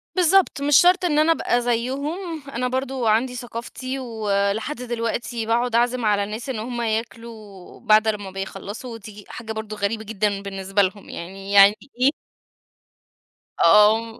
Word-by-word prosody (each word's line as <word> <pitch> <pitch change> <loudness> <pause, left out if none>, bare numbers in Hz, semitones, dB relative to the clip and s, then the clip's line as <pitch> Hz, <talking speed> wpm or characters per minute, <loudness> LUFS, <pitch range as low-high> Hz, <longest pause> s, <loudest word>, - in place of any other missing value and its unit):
بالضبط، 365 -3 +3
مش 285 -1 +5
شرط 360 +1 +5
إن 300 -4 +2
أنا 310 +2 +4
أبقى 245 -6 +1
زيهم، 280 +9 -2
أنا 250 -1 -2
برضو 260 0 -2
عندي 240 +4 +2
ثقافتي 245 +2 -6
ولحد 215 +1 -1
دلوقتي 235 -1 -3
باقعد 235 +1 0
أعزم 240 0 +1
على 205 -1 +2
الناس 215 +5 -6
إن 250 -5 -3
هم 240 +2 -4
ياكلوا 220 -3 -6
بعد 215 -1 +4
لمّا 205 -3 -2
بيخلصوا، 195 +5 -7
و - - -7
تييجي 210 -1 -12
حاجة 225 -1 -7
برضو 220 -1 -5
غريبة 215 +2 -2
جدًا 205 -2 -1
بالنسبة 195 0 -1
لهم 195 +1 -2
يعني 195 +3 -8
يعني 200 +1 +7 0.3
إيه 260 - +6 1.6
آه، 215 +5 +4
225 Hz, 150 wpm, -22 LUFS, 205-250 Hz, 1.6 s, يعني